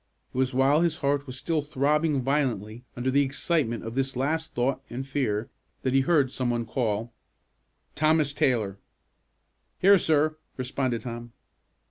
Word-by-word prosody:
It -, -, -7 dB
was 130 Hz, -1 st, +2 dB
while 135 Hz, +4 st, +3 dB
his 170 Hz, -2 st, +1 dB
heart 140 Hz, 0 st, +1 dB
was 130 Hz, 0 st, -6 dB
still 155 Hz, +3 st, 0 dB
throbbing 145 Hz, 0 st, +1 dB
violently 120 Hz, -5 st, -1 dB
under 125 Hz, +2 st, 0 dB
the 140 Hz, +2 st, +4 dB
excitement 140 Hz, -3 st, 0 dB
of 115 Hz, -, -5 dB
this 135 Hz, +1 st, -1 dB
last 160 Hz, +5 st, -1 dB
thought 125 Hz, +3 st, 0 dB
and 130 Hz, +3 st, -5 dB
fear, 115 Hz, -6 st, -1 dB, 0.3 s
that 130 Hz, -, 0 dB
he 135 Hz, -, +5 dB
heard 140 Hz, -3 st, +2 dB
some 130 Hz, -2 st, -1 dB
one 120 Hz, -1 st, -1 dB
call, 115 Hz, -1 st, -2 dB, 0.8 s
"Thomas 155 Hz, -1 st, +2 dB
Taylor!" 110 Hz, -9 st, 0 dB, 1.0 s
"Here, 195 Hz, +1 st, +6 dB
sir," 155 Hz, -1 st, +2 dB, 0.2 s
responded 130 Hz, -2 st, -1 dB
Tom. 120 Hz, -1 st, -7 dB
135 Hz, 150 wpm, -27 LUFS, 120-150 Hz, 1.0 s, Here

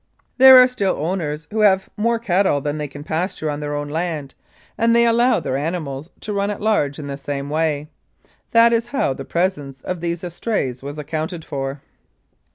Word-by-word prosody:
There 265 Hz, 0 st, +10 dB
are 250 Hz, 0 st, +8 dB
still 205 Hz, -7 st, -1 dB
owners 160 Hz, -2 st, -3 dB
who 220 Hz, -, -2 dB
have 190 Hz, -2 st, +4 dB
more 230 Hz, +2 st, +1 dB
cattle 190 Hz, -8 st, +1 dB
than 145 Hz, +2 st, -3 dB
they 150 Hz, -, -3 dB
can 145 Hz, +1 st, -10 dB
pasture 160 Hz, -1 st, -2 dB
on 145 Hz, -, -4 dB
their 145 Hz, 0 st, -3 dB
own 145 Hz, 0 st, -3 dB
land, 155 Hz, -2 st, -3 dB, 0.4 s
and 230 Hz, +1 st, +2 dB
they 235 Hz, 0 st, +5 dB
allow 235 Hz, +2 st, +3 dB
their 130 Hz, -, -3 dB
animals 155 Hz, -1 st, -4 dB
to 210 Hz, -, -4 dB
run 200 Hz, 0 st, 0 dB
at 205 Hz, -, -4 dB
large 205 Hz, -10 st, +1 dB
in 150 Hz, -, -7 dB
the 140 Hz, -1 st, -5 dB
same 140 Hz, 0 st, -5 dB
way. 155 Hz, -1 st, 0 dB, 0.6 s
That 230 Hz, 0 st, +5 dB
is 230 Hz, 0 st, +1 dB
how 240 Hz, -, 0 dB
the 135 Hz, +1 st, -8 dB
presence 145 Hz, -7 st, -2 dB
of 180 Hz, -2 st, -4 dB
these 170 Hz, 0 st, -3 dB
estrays 170 Hz, -, -3 dB
was 140 Hz, +2 st, -7 dB
accounted 160 Hz, +3 st, -4 dB
for. 135 Hz, 0 st, -5 dB
160 Hz, 190 wpm, -20 LUFS, 145-205 Hz, 0.6 s, There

